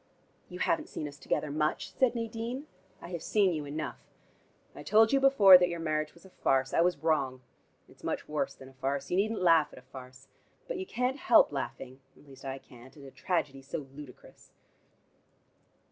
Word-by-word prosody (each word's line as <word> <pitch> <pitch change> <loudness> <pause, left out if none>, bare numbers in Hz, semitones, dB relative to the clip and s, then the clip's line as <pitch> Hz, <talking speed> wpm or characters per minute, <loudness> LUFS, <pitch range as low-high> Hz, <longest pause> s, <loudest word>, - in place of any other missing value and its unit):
"You - - -8
haven't 325 -2 0
seen 150 - -5
us 145 -1 -11
together 145 +2 -2
much," 155 +5 -1
said 255 -2 +2
Nadine. 230 +4 -4 0.4
"I 170 - -8
have 170 -2 -5
seen 200 -4 +2
you 150 -2 -4
enough: 150 +2 -5 0.7
I - - -10
told 220 +2 +4
you 275 - +5
before 210 -9 +8
that 180 0 +2
your 170 -1 -4
marriage 155 -1 -2
was 170 - -19
a 190 - -15
farce. 135 -5 0
I - - +3
was 175 0 +2
wrong. 140 -4 0 0.5
It's - - -21
much - - -3
worse 150 -2 -2
than 130 - -13
a - - -18
farce. 135 +2 -3
You 180 - +1
needn't 215 0 0
laugh 165 -3 +4
at - - -14
a 125 - -13
farce. 130 0 -13 0.4
But - - -4
you 380 - -5
can't 250 +3 -1
help - - +5
laughing, 130 +1 -6 0.2
at - - -19
least 135 -1 -15
I 135 0 -4
can't, 130 +1 -16
at 140 - -13
a 135 - -11
tragedy 145 -6 -2
so 135 +2 -6
ludicrous." 145 -4 -13
155 Hz, 195 wpm, -30 LUFS, 135-205 Hz, 0.7 s, before